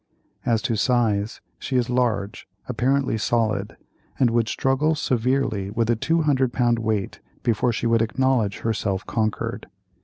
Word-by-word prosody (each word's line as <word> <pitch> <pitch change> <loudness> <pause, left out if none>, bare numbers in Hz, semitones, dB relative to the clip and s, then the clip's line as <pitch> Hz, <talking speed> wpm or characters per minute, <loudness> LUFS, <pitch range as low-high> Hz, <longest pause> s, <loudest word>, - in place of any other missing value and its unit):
As 115 -2 +2
to 125 -4 0
size—she 115 +2 -1
is 125 -2 +2
large, 120 -3 -1 0.2
apparently 125 0 +1
solid, 110 -3 0 0.4
and 125 -3 +3
would 115 -1 +2
struggle 135 +7 +1
severely 125 -7 0
with 115 +2 0
a - - +3
200 145 -2 +1
pound 120 -2 +1
weight 110 -3 -2 0.2
before 120 0 +1
she 115 - -3
would 115 -1 +3
acknowledge 115 -3 +1
herself 100 -4 -1
conquered. 110 -2 -2
115 Hz, 130 wpm, -23 LUFS, 110-130 Hz, 0.4 s, and